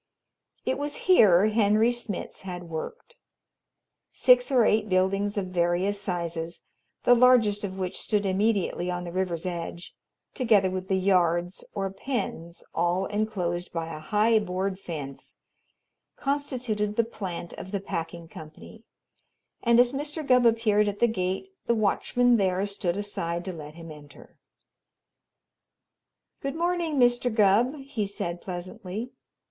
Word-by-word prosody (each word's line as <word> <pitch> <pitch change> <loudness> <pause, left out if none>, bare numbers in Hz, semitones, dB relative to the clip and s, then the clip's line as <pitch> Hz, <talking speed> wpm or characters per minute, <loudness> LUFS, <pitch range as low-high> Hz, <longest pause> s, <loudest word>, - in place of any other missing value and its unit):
It 260 - 0
was 290 0 -3
here 210 - +6
Henry 215 +1 +3
Smitz 240 -5 -5
had 180 -2 -6
worked. 470 - -7 0.9
Six 250 -1 +4
or 245 -4 +5
eight 215 0 +2
buildings 195 +2 +1
of 190 -2 -2
various 180 +3 +1
sizes, 170 -3 -4 0.4
the 245 - +6
largest 235 -4 +4
of 190 -1 -4
which 185 -1 -3
stood 210 -2 0
immediately 195 -2 0
on 175 0 -3
the 175 - -6
river's 180 -2 -2
edge, 170 -1 -5 0.4
together 210 -7 +3
with 185 0 -4
the 190 - +1
"yards" 180 -2 +1
or 195 -2 -2
pens, 195 -7 -4
all 175 +3 +1
enclosed 190 -5 -2
by 165 -1 -4
a - - -7
high 215 +7 +3
board 190 -1 -3
fence, 145 -7 -8 0.8
constituted 250 -7 -2
the 230 - +3
plant 190 -6 -6
of - - -8
the 200 - -1
packing 170 -3 -5
company, 160 +8 -12 0.8
and 235 0 +4
as 245 +1 +5
Mr. 295 +2 -4
Gubb 250 -2 +5
appeared 215 -2 +3
at 205 0 -2
the 235 - +4
gate 190 - -2 0.2
the 235 - +3
watchman 240 +3 +2
there 190 -1 +1
stood 195 -3 -2
aside 175 -4 -3
to 185 - -4
let 155 -2 -9
him 165 -1 -10
enter. 145 -1 -15 2.0
"Good 275 +1 -3
morning, 340 -2 0
Mr. 245 -1 +3
Gubb," 220 +5 +3
he 245 -7 -3
said 175 -3 -4
pleasantly. 185 +5 -6
200 Hz, 140 wpm, -27 LUFS, 175-230 Hz, 2.0 s, here